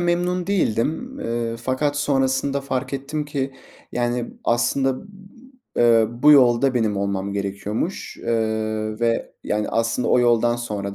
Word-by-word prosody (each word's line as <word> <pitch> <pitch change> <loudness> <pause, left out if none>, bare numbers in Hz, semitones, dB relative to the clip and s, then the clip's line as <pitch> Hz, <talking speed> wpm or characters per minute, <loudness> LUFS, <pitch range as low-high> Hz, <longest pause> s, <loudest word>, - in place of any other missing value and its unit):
memnun 175 +1 0
değildim. 195 - -1
Iıı, 115 0 -2
fakat 130 +5 -1
sonrasında 140 -1 +1
fark 130 -1 -3
ettim 145 +3 -3
ki, 135 -2 -3 0.4
yani, 120 0 -1
aslında, 130 +5 +1 0.7
ııı, 120 +1 +3
bu 150 0 +8
yolda 130 -1 +5
benim 110 -4 +1
olmam 100 0 -2
gerekiyormuş, 100 - -3
ııı, 110 -1 -1
ve, 115 -1 0
yani, 105 0 -1
aslında 115 +2 0
o 125 - +4
yoldan 120 0 +3
sonra 100 -4 -4
120 Hz, 125 wpm, -22 LUFS, 110-140 Hz, 0.7 s, bu